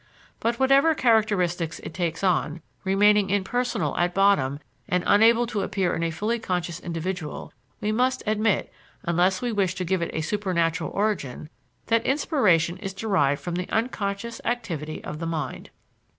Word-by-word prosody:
But 235 +1 0
whatever 275 +4 +4
characteristics 185 - +1
it - - -8
takes 170 0 -2
on, 170 -3 0 0.2
remaining 200 +1 +4
impersonal 205 - 0
at 175 0 +1
bottom 195 -9 +3 0.3
and 180 0 +1
unable 230 +3 +5
to 215 -3 -2
appear 195 -3 0
in 165 - -2
a 165 - +1
fully 215 +8 -1
conscious 180 -4 -3
individual, 170 -1 -5 0.3
we 210 - 0
must 255 +3 +1
admit, 215 -1 0 0.3
unless 180 +4 +1
we 245 - 0
wish 195 -4 0
to 185 - -3
give 185 +1 0
it 170 - -1
a 160 - 0
supernatural 170 -3 0
origin, 185 - -2 0.3
that 230 0 +2
inspiration 205 - +2
is 195 0 -6
derived 170 -10 +1
from 175 - -4
the 180 +1 -3
unconscious 225 -1 -2
activity 170 -11 -3
of 150 - -6
the 165 - -3
mind. 155 -5 -4
190 Hz, 155 wpm, -25 LUFS, 170-220 Hz, 0.3 s, unable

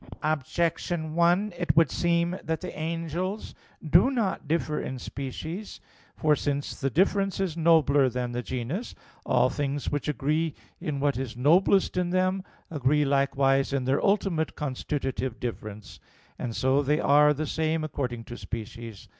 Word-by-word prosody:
Objection 155 +2 -1
1: 175 +5 +3
It 175 -2 0
would 165 -4 +5
seem 170 0 +1
that 160 -1 -2
the 180 - -6
angels 165 +5 -3 0.3
do 175 - +6
not 225 - -1
differ 155 -1 0
in 130 - -4
species. 155 - -6 0.4
For 155 -2 +3
since 145 -1 -3
the 135 - +1
"difference" 195 +5 +1
is 185 -5 -1
nobler 155 -5 +4
than 125 0 -3
the 120 0 -2
'genus,' 130 - -4 0.3
all - - +3
things 145 -1 -2
which 145 0 -2
agree 150 +2 0 0.2
in 145 -2 -3
what 140 -2 +1
is 125 -3 -5
noblest 180 +9 +3
in 180 -1 +1
them, 185 +1 +1 0.3
agree 150 0 +2
likewise 135 0 +2
in 135 -2 0
their 135 +2 +1
ultimate 195 -5 +1
constitutive 135 -3 -3
difference; 110 -4 -6 0.4
and 120 -3 -4
so 130 +2 +2
they 150 +2 +1
are 150 +1 +5
the 150 +2 -1
same 160 +1 0
according 125 -6 -3
to 120 +1 -9
species. 115 -2 -7
150 Hz, 150 wpm, -27 LUFS, 135-170 Hz, 0.4 s, do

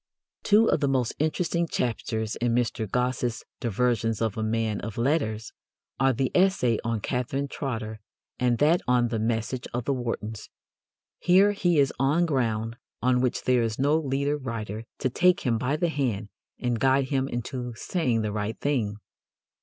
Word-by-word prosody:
Two 215 +2 +5
of - - +2
the 145 - +1
most 130 -3 +1
interesting 170 +2 0
chapters 110 -4 -2
in 120 -1 +1
Mr. 115 -3 -1
Gosse's 125 -1 -1 0.2
Diversions 115 -1 0
of 110 -3 0
a 110 - -3
Man 110 -1 0
of 110 -1 -6
Letters 115 -4 0 0.5
are 135 0 +4
the 130 +1 -1
essay 180 - +3
on 115 -2 -1
Catherine 125 +5 -2
Trotter 110 -6 -4 0.4
and 125 -1 +2
that 155 +6 +4
on 120 -1 +3
"the 115 -1 -1
message 115 +3 -1
of 120 -1 -2
the 140 - +1
Wartons." 115 -4 -4 0.7
Here 190 +3 +5
he 175 -5 +1
is 140 -2 +3
on 145 +6 +3
ground 115 -6 -1 0.3
on 125 0 +3
which 125 -1 0
there 125 -1 +3
is 115 -1 -1
no 145 +3 +3
leader 140 -1 0
writer 115 -5 -5
to 130 - 0
take 180 +6 +3
him 115 -4 +1
by 130 +5 0
the 170 +2 +1
hand 115 -9 -1 0.3
and 120 -2 -1
guide 135 +1 +3
him 135 -1 +1
into 125 0 -4
saying 120 -5 0
"the 105 - -1
right 105 +1 -3
thing." 120 -8 0
125 Hz, 170 wpm, -26 LUFS, 115-140 Hz, 0.7 s, Two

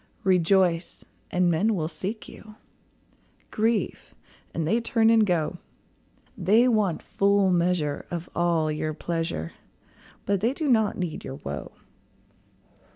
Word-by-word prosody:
Rejoice, 180 -2 +2 0.2
and 180 -1 +2
men 205 +7 +2
will 160 -4 -1
seek 200 +6 -5
you; 215 0 -13 1.0
Grieve, 220 0 -1 0.4
and 160 -2 -2
they 225 +7 +2
turn 225 -1 +3
and 225 -1 +5
go; 175 -1 0 0.8
They 215 +4 +4
want 210 -8 +1
full 200 -1 +2
measure 170 -4 0
of 175 -1 -5
all 170 -3 +1
your 155 0 -3
pleasure, 165 - -3 0.7
But 200 -2 0
they 235 +4 +1
do 310 -1 -2
not 220 -5 +2
need 175 -4 -4
your 135 - -6
woe. 75 - -7
180 Hz, 125 wpm, -26 LUFS, 165-215 Hz, 1.0 s, and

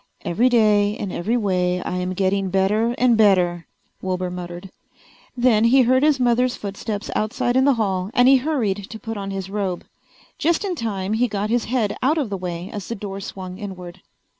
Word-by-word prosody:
"Every 200 +9 +2
day 210 -3 +3
in 200 -3 -4
every 220 +9 -1
way 180 -4 0
I 180 - -3
am 180 0 -2
getting 195 0 0
better 210 +5 +1
and 250 -2 +4
better," 180 -5 +3 0.3
Wilbur 185 -1 -2
muttered. 180 +1 -7 0.7
Then 235 -3 +4
he 260 +3 +5
heard 255 +2 +3
his 295 -2 +3
mother's 250 0 +2
footsteps 205 +1 -5
outside 215 +3 0
in 260 +1 +4
the 280 -2 +4
hall 190 -4 -1
and 245 0 +5
he 270 0 +7
hurried 230 -9 -1
to 220 - -7
put 225 0 -6
on 200 -1 -5
his 195 -1 -5
robe. 195 -4 -3 0.5
Just 335 +5 +1
in 380 - -1
time 210 - -3
he 240 +3 +2
got 210 0 -3
his 240 -1 +1
head 230 -4 0
out 295 +5 +2
of 270 -9 -2
the - - -1
way 175 -1 -5
as 205 -2 -6
the 230 - -4
door 195 -1 -6
swung 185 -1 -7
inward. 185 -3 -8
205 Hz, 195 wpm, -22 LUFS, 185-240 Hz, 0.7 s, he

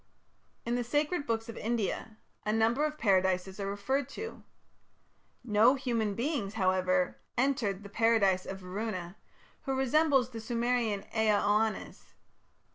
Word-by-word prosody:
In 235 - -1
the 245 0 0
sacred 295 +5 0
books 225 0 -1
of 230 - -7
India 220 -1 -2 0.3
a 210 - 0
number 225 +6 +2
of 305 0 -3
Paradises 190 -3 +1
are 195 0 -2
referred 255 +7 -1
to. 450 +1 -7 1.0
No 225 +3 +5
human 230 -6 -1
beings, 235 -5 -2
however, 185 -2 +1 0.2
entered 235 -7 0
the - - -8
Paradise 200 -4 +2
of 190 0 -6
Varuna, 185 -1 -4 0.5
who 270 -1 -1
resembles 270 -1 +3
the 225 -2 -6
Sumerian 235 -2 0
Ea 220 -1 +3
Oannes. 215 +1 -1
225 Hz, 130 wpm, -31 LUFS, 200-250 Hz, 1.0 s, No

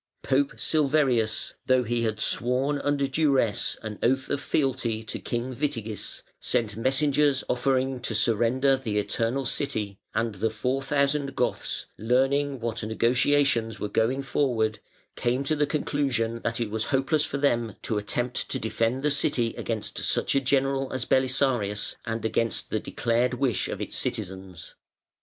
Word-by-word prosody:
Pope 140 +1 +2
Silverius, 135 -7 +2
though 130 -1 +4
he 120 +1 -1
had 110 -2 -1
sworn 130 +6 +1
under 145 0 +1
duresse 135 -6 +1
an 110 -2 -6
oath 130 +2 +1
of 145 - 0
fealty 125 -7 0
to 110 - -5
King 120 +2 -3
Witigis, 115 -7 -3 0.2
sent 105 -4 0
messengers 135 +3 +2
offering 130 +1 +1
to 120 -2 -3
surrender 120 +5 +3
the 115 -6 -3
Eternal 115 +5 0
City, 105 -8 -1 0.2
and 115 0 0
the 105 +3 0
four 125 +5 -1
thousand 140 0 0
Goths, 125 - -1
learning 135 +4 +2
what 115 -1 -3
negotiations 115 +1 +2
were 105 - -3
going 125 +6 +1
forward, 120 -5 0 0.4
came 125 +3 0
to 155 +3 +1
the 150 -1 +1
conclusion 135 -7 -1
that 115 +1 -1
it 115 -3 -2
was 110 0 -1
hopeless 140 +3 +1
for 140 - -3
them 120 -6 +1
to 110 - 0
attempt 120 +4 -2
to - - +1
defend 115 +4 -1
the 150 - +2
City 130 -5 +1
against 110 -2 -4
such - - +1
a 140 - +3
general 135 0 +1
as 130 -2 -2
Belisarius 130 -6 +1
and 115 0 -3
against 115 +1 -1
the - - +1
declared 120 +2 0
wish 125 -3 0
of - - -4
the - - -5
citizens. 95 -2 -4
125 Hz, 150 wpm, -26 LUFS, 115-135 Hz, 0.4 s, though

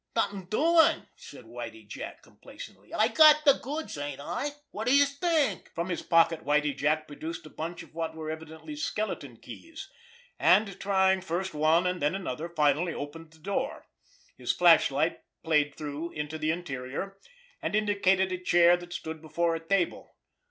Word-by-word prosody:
"Nothin' 200 -4 -1
doin'!" 320 - +3
said - - -13
Whitie - - -8
Jack - - -8
complacently. - - -13
"I - - +3
got 305 -1 +6
de 280 - +8
goods, 290 - -5
ain't 145 -1 -5
I? 180 - -3 0.2
Wot 220 +3 -5
d'youse 280 +2 +4
think!" 310 - +1
From 170 +2 -2
his 175 - -2
pocket 165 -1 +3
Whitie 150 0 +1
Jack 155 +3 0
produced 160 +3 -7
a 155 - -12
bunch 165 +2 -6
of - - -18
what 165 -1 -4
were 155 -1 -5
evidently 160 - -8
skeleton 215 -8 -4
keys; 330 +4 -11 0.5
and, 195 +3 +3
trying 190 -1 +2
first 185 +1 -3
one 155 +4 +3
and 180 0 -1
then 150 +5 +1
another, 170 -4 -4
finally 155 +1 +1
opened 155 +3 -7
the 160 - -19
door. 200 - -3 0.5
His - - 0
flashlight - - +4 0.2
played 150 -3 +2
through 150 +2 -5
into 150 +1 -5
the 155 0 -1
interior, 160 +3 -4 0.4
and - - -2
indicated 195 -3 +2
a 185 - -3
chair 175 -1 +5
that 175 0 -10
stood 160 -2 -6
before 165 +2 0
a - - -3
table. 175 +2 -1
170 Hz, 165 wpm, -28 LUFS, 155-200 Hz, 0.5 s, de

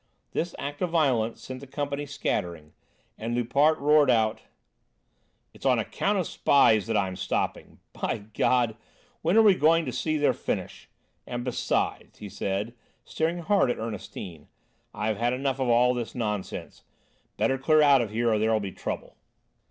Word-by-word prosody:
This 170 +1 -2
act 145 +1 -6
of 180 - 0
violence 130 -9 +1
sent 130 0 -7
the 140 - -11
company 145 +1 -4
scattering, 85 - -3 0.5
and 115 +2 -3
Loupart 140 +6 +3
roared 150 -1 +4
out: 110 -3 +2 1.1
"It's - - -16
on - - +3
account 205 +1 -1
of 185 - 0
spies 110 -10 +3
that 115 -1 +1
I'm 95 -2 -1
stopping! - - -3 0.2
By 100 - -3
God! 120 -2 +2 0.5
When 170 +6 +2
are 225 - +7
we 205 -2 +7
going 165 -1 +3
to 130 - -3
see 155 +4 -1
their 145 -1 +3
finish? - - -5 0.4
And 120 -1 -4
besides," 125 -1 -2
he - - -9 0.2
added, 100 +4 -2 0.3
staring 165 +2 -2
hard 195 -5 +3
at - - -1
Ernestine, 95 -7 -7 0.4
"I've 105 0 -2
had 120 +2 +1
enough 135 +1 -1
of 130 -2 0
all 120 +1 +4
this 120 -2 -5
nonsense; 105 -5 -4 0.6
better 120 +6 +1
clear 155 +3 +4
out 140 -3 +6
of 115 - -3
here 115 +2 0
or 105 - +1
there'll 110 0 +2
be 100 -2 -5
trouble." - - -6
125 Hz, 165 wpm, -26 LUFS, 110-145 Hz, 1.1 s, are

